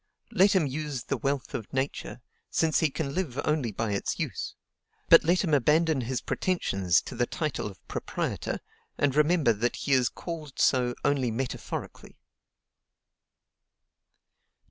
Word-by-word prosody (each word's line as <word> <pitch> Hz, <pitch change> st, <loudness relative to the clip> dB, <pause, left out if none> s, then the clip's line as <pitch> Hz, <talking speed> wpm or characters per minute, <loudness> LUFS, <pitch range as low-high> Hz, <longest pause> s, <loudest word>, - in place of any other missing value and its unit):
Let 195 Hz, +2 st, +5 dB
him 180 Hz, -5 st, +4 dB
use 145 Hz, -2 st, -3 dB
the -, -, -2 dB
wealth 140 Hz, -2 st, -2 dB
of 110 Hz, -, -5 dB
Nature, 130 Hz, -1 st, -3 dB, 0.3 s
since 160 Hz, -2 st, +2 dB
he 160 Hz, -, +3 dB
can 140 Hz, 0 st, -3 dB
live 160 Hz, -8 st, -2 dB
only 150 Hz, -7 st, +1 dB
by 110 Hz, +1 st, -2 dB
its 100 Hz, -, -1 dB
use; -, -, -4 dB, 0.5 s
but -, -, +9 dB
let 175 Hz, +4 st, +3 dB
him 160 Hz, -5 st, 0 dB
abandon 150 Hz, +2 st, +3 dB
his 125 Hz, +1 st, -2 dB
pretensions 95 Hz, -, +1 dB
to -, -, -7 dB
the 120 Hz, 0 st, 0 dB
title 155 Hz, -9 st, -2 dB
of 95 Hz, -6 st, -12 dB
proprietor, -, -, -3 dB, 0.4 s
and 140 Hz, -2 st, +1 dB
remember 150 Hz, -5 st, +4 dB
that 120 Hz, +4 st, -1 dB
he -, -, -3 dB
is 125 Hz, -2 st, +4 dB
called 155 Hz, -5 st, -7 dB
so 125 Hz, -2 st, +3 dB
only 140 Hz, -3 st, +2 dB
metaphorically. 125 Hz, +3 st, -5 dB
140 Hz, 145 wpm, -28 LUFS, 120-155 Hz, 0.5 s, but